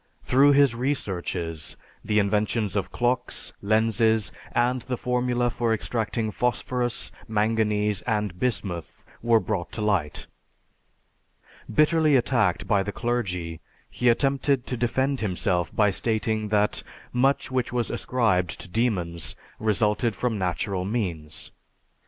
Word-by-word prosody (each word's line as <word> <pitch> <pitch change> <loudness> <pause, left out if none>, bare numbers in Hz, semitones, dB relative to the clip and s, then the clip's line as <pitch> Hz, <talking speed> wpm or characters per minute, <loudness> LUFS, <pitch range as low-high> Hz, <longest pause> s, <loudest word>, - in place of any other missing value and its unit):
Through 140 +3 +5
his 140 -3 +5
researches 90 - -3 0.3
the 105 - 0
inventions 105 +1 +1
of 100 - -1
clocks, 125 +1 -1
lenses, 110 +1 +2 0.2
and 125 +1 +1
the 125 +1 -3
formula 125 0 0
for 115 -1 0
extracting 110 0 -2
phosphorus, 125 +1 -1 0.2
manganese, 105 -1 +1
and 105 -5 -1
bismuth 95 -9 -2 0.2
were 115 -1 +4
brought 95 -3 -3
to 110 - -4
light. 95 -8 0 1.5
Bitterly 155 +3 +4
attacked 120 -7 +2
by 100 -2 +3
the 105 +1 -3
clergy, 90 -9 -2 0.3
he 125 - +2
attempted 135 +1 +2
to 125 - -3
defend 130 +3 0
himself 90 -3 0
by 105 -2 +4
stating 110 +1 -1
that 105 0 +1 0.3
much 135 +2 +2
which 130 -2 0
was 120 -1 0
ascribed 110 -8 0
to - - -8
demons 90 -6 -1 0.2
resulted 105 +1 +1
from 125 -3 -1
natural 90 +1 -1
means. 90 -8 -3
110 Hz, 120 wpm, -25 LUFS, 100-125 Hz, 1.5 s, Through